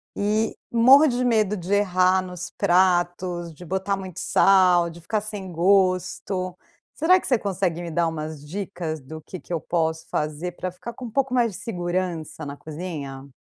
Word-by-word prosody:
e 215 +2 0 0.2
morro 265 +6 +7
de 250 -1 0
medo 215 -4 +2
de 180 +3 -3
errar 185 -2 +3
nos 180 -1 -7
pratos, 175 -2 +1
de 175 +3 -12
botar 190 +3 -1
muito 185 -2 -7
sal, 180 -3 +4
de 170 +1 -13
ficar 210 +5 -1
sem 205 -3 -6
gosto. 185 0 +1 0.4
Será 365 +5 +4
que - - -9
você 250 -4 +2
consegue 185 -4 -1
me 170 - -5
dar 170 +1 +1
umas 155 -1 -5
dicas 175 -3 -4
do 155 +4 -9
que 185 - -8
que - - -16
eu 170 - 0
posso 160 0 -1
fazer 155 +4 -2
pra 185 +1 -4
ficar 230 +6 -8
com 250 - -8
um 230 - -7
pouco 265 +2 0
mais 235 -3 +3
de - - -6
segurança 175 -5 -3
na 140 - -6
cozinha? 150 -4 -7
185 Hz, 180 wpm, -24 LUFS, 170-200 Hz, 0.4 s, morro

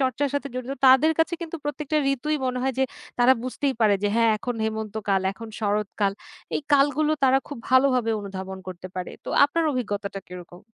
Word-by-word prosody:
চর্চার 265 +2 +1
সাথে 285 0 -1
জড়িত 255 +1 -4
তাদের 265 +5 +6
কাছে 325 +1 +2
কিন্তু 335 0 -5
প্রত্যেকটা 295 +1 -2 0.2
ঋতুই 300 +4 -2
মনে 255 0 -1
হয় 265 0 0
যে, 265 - +4 0.3
তারা 245 +1 +6
বুঝতেই 265 +2 -1
পারে 215 -2 +5
যে 205 - +2
"হ্যাঁ, 230 -1 +4
এখন 245 +3 -3
হেমন্ত 220 -1 -3
কাল, 195 -1 +2
এখন 225 +4 -10
শরৎকাল।" 205 -1 0 0.4
এই - - 0
কালগুলো 290 +2 +3
তারা 265 0 +5
খুব 290 - -7
ভালোভাবে 255 -3 +4
অনুধাবন 190 -1 -6
করতে 180 0 -7
পারে। 180 -1 -4
তো - - -7 0.2
আপনার 325 +4 0
অভিজ্ঞতাটা 205 -5 -3
কিরকম? 180 -1 -10
250 Hz, 185 wpm, -25 LUFS, 205-280 Hz, 0.4 s, তাদের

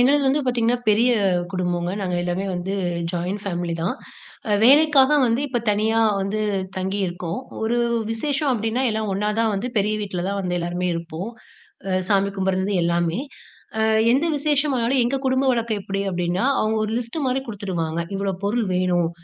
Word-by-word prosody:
எங்களது 280 +4 +4
வந்து 275 +3 +3
பாத்தீங்கன்னா, 245 -1 +1
பெரிய 230 +4 +4 0.4
குடும்பங்க. 175 -2 -1
நாங்க 185 -2 -2
எல்லாமே 180 +2 -2
வந்து 180 +2 -3 0.4
ஜாயின் 180 +4 -2
ஃபேமிலி 175 -3 -2
தான். 185 +9 -1 0.7
வேலைக்காக 290 +2 +6
வந்து 230 +1 +1
இப்ப 245 - 0
தனியா 220 +2 +1 0.2
வந்து 195 +2 -2 0.4
தங்கி 190 +2 -2
இருக்கோம். 175 -1 -4 0.2
ஒரு 235 +2 +1 0.3
விசேஷம் 285 +4 0
அப்டின்னா 225 +2 -1
எல்லாம் 215 -1 -2
ஒன்னா 210 +2 -1
தான் 225 -1 +2
வந்து 235 +6 -2
பெரிய 210 +1 +2
வீட்டுல 185 -3 -3
தான் 200 0 -2
வந்து 180 -2 -2
எல்லாருமே 175 +1 -2
இருப்போம். 170 +5 -5 0.8
சாமி 200 -1 +3
கும்பிடுறதுல 190 0 +1
இருந்து 200 0 0
எல்லாமே. 170 +2 +1 0.6
அ - - +1 0.3
எந்த 280 +6 +2
விசேஷம் 290 0 +1
வந்தாலும் 245 +2 +2
எங்க 265 +3 0
குடும்ப 260 +1 +2
வழக்கம் 230 -3 -1
எப்புடி 195 +1 -3
அப்டின்னா, 180 +3 -1 0.2
அவங்க 215 +1 +1
ஒரு 215 - -3
லிஸ்ட் 245 +6 -5
மாதிரி 260 +1 +1
குடுத்துருவாங்க. 175 -6 -3
இவ்வளவு 195 -1 -2
பொருள் 220 +1 0
வேணும், 180 -2 +2
205 Hz, 160 wpm, -22 LUFS, 180-245 Hz, 0.8 s, வேலைக்காக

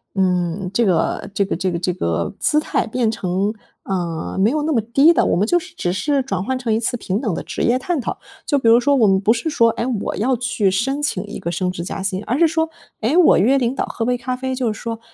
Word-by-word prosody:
嗯， 180 -1 0
这 235 +2 +2
个 180 - 0
这 200 - +2
个 - - -2
这 185 +2 -1
个 170 - -2
这 180 +1 -1
个 85 - -2
姿 300 - +3
态 305 - -1
变 225 -1 0
成， 195 +1 -1 0.3
呃， 175 -4 -3
没 205 +4 +4
有 300 +2 -1
那 315 - 0
么 240 -6 +2
低 275 +9 +4
的， - - +3
我 - - +1
们 195 - +2
就 350 - +3
是 - - -13
只 175 - -1
是 275 +7 0
转 195 -7 -3
换 260 +4 -1
成 240 -4 -1
一 220 - +1
次 240 +1 -1
平 200 0 -2
等 225 -7 -1
的 - - -4
职 - - -5
业 240 +2 +3
探 305 +3 -2
讨。 - - -4 0.3
就 285 - +1
比 260 - 0
如 230 +1 +7
说 280 +3 +2
我 240 -5 +4
们 190 -1 +3
不 205 +2 +3
是 235 +7 -1
说， 230 -7 +3
哎， 230 +1 -2 0.2
我 - - -3
要 250 +4 +1
去 230 -5 0
申 270 +9 -1
请 200 -10 -1
一 205 - -7
个 170 - -4
升 180 +2 -1
职 180 -2 -4
加 185 - -5
薪， 195 +1 -2
而 250 +6 -1
是 335 - +6
说， 320 0 -1 0.3
哎， 230 +8 +1
我 360 - +6
约 260 +8 +3
领 245 0 0
导 - - -1
喝 230 - -4
杯 245 +1 +1
咖 250 +1 -3
啡， 260 0 -3
就 245 -4 -1
是 - - -11
说， 230 -1 -4
225 Hz, 295 characters per minute, -20 LUFS, 190-260 Hz, 0.3 s, 如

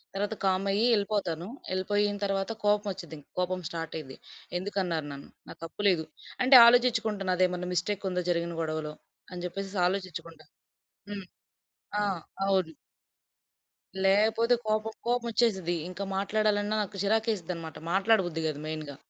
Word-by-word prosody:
తర్వాత 205 +2 -1
కామయ్యి 195 +3 +2
ఎళిపోతాను. 200 -5 -1 0.3
ఎళిపోయిన 205 +2 +1
తరవాత, 195 +1 0
కోపం 210 0 +3
వచ్చిద్ది. 170 -4 -9
ఇంక 145 - -20
కోపం 180 0 0
స్టాటయిద్ది. 160 -5 -6 0.4
ఎందుకన్నారు 180 -5 -2
నన్ను? 140 0 -9 0.2
నా - - -8
తప్పు 165 +5 -6
లేదు. 160 -4 +1 0.4
అంటే 260 +1 +7
ఆలోచించుకుంటా. 235 -4 +3
నాదేమన్నా 180 0 +1
మిస్టేక్ 195 +3 -1
ఉందా 180 0 -1
జరిగిన 170 -1 0
గొడవలో? 155 -1 -3 0.4
అని 175 -1 -6
చెప్పేసేసి 195 +2 -5
ఆలోచిచ్చుకుంటా. 175 -4 -5 0.7
హ్మ్. 200 -2 -6 0.8
ఆ! - - +2 0.4
అవును. 190 -4 +1 1.3
లేపోతే 220 +4 +4
కోపం 215 +1 0
కోపమొచ్చేసిద్ది. 230 -7 +1
ఇంక 185 +2 -6
మాట్లాడాలన్నా, 205 +1 +1
నాకు 200 0 -6
చిరాకేసిద్దనమాట. 195 -7 -1
మాట్లాడబుద్ది 190 -4 +2
కాదు 150 -2 -2
మెయిన్‌గా. 155 -3 -5
190 Hz, 120 wpm, -29 LUFS, 170-210 Hz, 1.3 s, అంటే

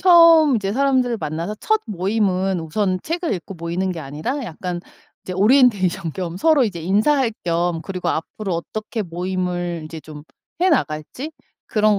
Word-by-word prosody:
처음 335 -6 +7
이제 200 -2 -1
사람들을 260 -1 +2
만나서 165 +4 -3
첫 435 -1 +2
모임은 190 -2 0
우선 185 +4 0
책을 335 +1 -2
읽고 185 +2 -7
모이는 175 +2 -2
게 170 - -6
아니라 155 - -4
약간 175 -2 -5 0.4
이제 185 - -6
오리엔테이션 200 - +3
겸 175 -1 -4
서로 300 - +4
이제 185 -7 -3
인사할 225 - +2
겸 170 0 0
그리고 185 -1 -4
앞으로 190 +4 -2
어떻게 215 +6 -4
모임을 175 -1 -2
인제 160 +1 -8
좀 150 -1 -10 0.4
해 370 - +4
나갈지 250 - -1 0.3
그런 210 -1 +3
190 Hz, 340 characters per minute, -21 LUFS, 170-245 Hz, 0.4 s, 처음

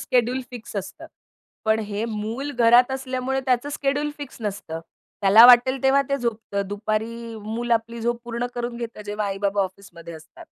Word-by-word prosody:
Schedule 250 +1 +1
fix 235 -4 -9
असतं. 195 - -6 0.6
पण 220 0 +3
हे 210 +1 -3
मूल 230 +5 -4
घरात 240 +1 +5
असल्यामुळे 260 0 -2
त्याचं 250 +2 +1
शेड्यूल 290 +1 -1
फिक्स 285 -3 -8
नसतं. 195 -6 -5 0.4
त्याला 215 +5 +9
वाटेल 250 +1 +6
तेव्हा 270 +1 +4
ते 275 - +1
झोपत 225 -5 -4
दुपारी 220 +3 -3
मुल 230 +3 -4
आपली 230 +1 -1
झोप 235 +1 -1
पूर्ण 240 +1 -3
करून 240 0 -4
घेतं. 230 -3 -6
जेव्हा 210 0 -3
आई-बाबा 200 0 0
ऑफिसमध्ये 185 -3 -8
असतात. 155 0 -13
230 Hz, 160 wpm, -23 LUFS, 210-250 Hz, 0.6 s, त्याला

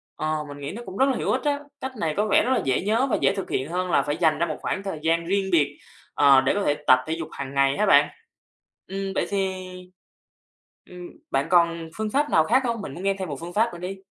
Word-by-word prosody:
ờ, 155 0 -1
mình 145 0 -9
nghĩ 140 0 -5
nó 230 - -7
cũng 190 0 -8
rất 265 - +4
là 265 - 0
hữu - - -1
ích 255 - 0
á, 290 -1 0 0.2
cách 265 - -4
này 160 -2 0
có 210 +1 +1
vẻ 205 - +4
rất 255 - 0
là 260 - +2
dễ 130 -1 +1
nhớ 225 +7 +1
và - - +2
dễ - - +3
thực 195 - -5
hiện 130 +3 -2
hơn 180 +1 -2
là - - +4
phải 145 +1 -3
dành 160 -3 +2
ra 170 - +2
một - - -4
khoảng 195 - -3
thời 190 -6 -5
gian 165 +1 +1
riêng 195 +2 0
biệt, 145 -4 +2 0.4
ờ, 140 -2 +6
để 130 - +1
có 205 - -1
thể 145 - +2
tập 130 0 +7
thể 160 - -1
dục 165 -1 -5
hàng 140 -1 -7
ngày 140 0 +2
ha 210 - +2
bạn. 195 - +5 0.8
Ừm, 195 0 -4
vậy - - +1
thì, 195 -1 0 1.4
ừm, 180 -1 -9 0.2
bạn 135 +3 0
còn 170 -2 +2
phương 215 0 -2
pháp 290 +6 +1
nào 160 - +4
khác 255 +9 +3
hông? 235 -2 -2
Mình 145 - -7
muốn 175 - -8
nghe 195 0 +2
thêm 190 -3 -4
một 140 -2 -5
phương 170 +1 -8
pháp 220 -1 +1
nữa 175 - -8
đi. 185 +2 -5
180 Hz, 270 wpm, -24 LUFS, 155-200 Hz, 1.4 s, tập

